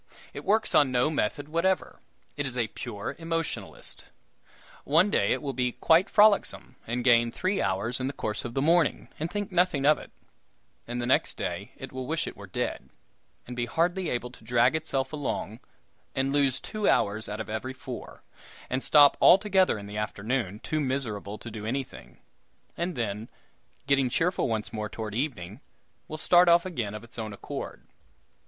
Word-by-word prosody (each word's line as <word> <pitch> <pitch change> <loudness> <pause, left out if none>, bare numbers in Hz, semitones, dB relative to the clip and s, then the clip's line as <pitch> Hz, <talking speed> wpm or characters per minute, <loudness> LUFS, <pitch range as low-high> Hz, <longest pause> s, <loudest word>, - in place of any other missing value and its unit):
It - - -7
works 220 +2 +2
on 140 -3 +5
no 125 +4 +2
method 145 +1 -1
whatever; 170 +4 0 0.4
it 145 -2 -2
is 125 -1 -5
a 115 -3 0
pure 100 +1 -6
emotionalist. 165 -1 -4 0.8
One 170 +8 +4
day - - +2
it - - 0
will 140 -2 -2
be 125 -1 0
quite 165 +4 +4
frolicsome, 205 - +3
and 120 +1 -2
gain 120 -2 +5
three 185 - -1
hours 100 +6 0
in 130 - -1
the - - -1
course 105 -5 -3
of 120 -1 -6
the 135 - +1
morning, 165 0 +2
and 160 +2 -2
think 205 +2 -4
nothing 180 -6 +2
of 150 +1 +5
it; - - -11 0.8
and 120 +1 -3
the 120 - -1
next 130 - +2
day - - -4
it - - -8
will 130 -1 -5
wish 160 +2 -1
it - - -6
were - - -11
dead, - - -3 0.6
and 125 - -7
be 120 -1 -2
hardly 175 +6 0
able 125 0 -3
to 125 - -16
drag 120 +4 +3
itself 140 -3 -2
along, 130 -6 -3 0.6
and 135 +1 0
lose 140 -3 +2
two 215 -1 -1
hours 105 +1 +1
out 105 +1 -4
of 110 - -4
every 110 +4 -4
four, 130 -1 -9 0.5
and 130 +1 0
stop 145 -2 +7
altogether 190 - +5
in 100 - -8
the 105 +1 -7
afternoon, 105 0 -2
too 155 - -2
miserable 120 -7 -2
to 115 - -9
do 105 -1 -7
anything; 130 +4 -5 0.6
and 175 0 -2
then, 110 -2 -3 0.6
getting 140 -2 +3
cheerful 175 +8 +1
once 110 -3 -3
more 105 -1 -3
toward 110 -1 -6
evening, 110 - -3 0.5
will 155 - -6
start 175 +2 +5
off 170 +1 +5
again 120 - -3
of 105 - -7
its 120 0 -11
own 110 -1 -4
accord. 100 - -7
130 Hz, 180 wpm, -28 LUFS, 110-160 Hz, 0.8 s, stop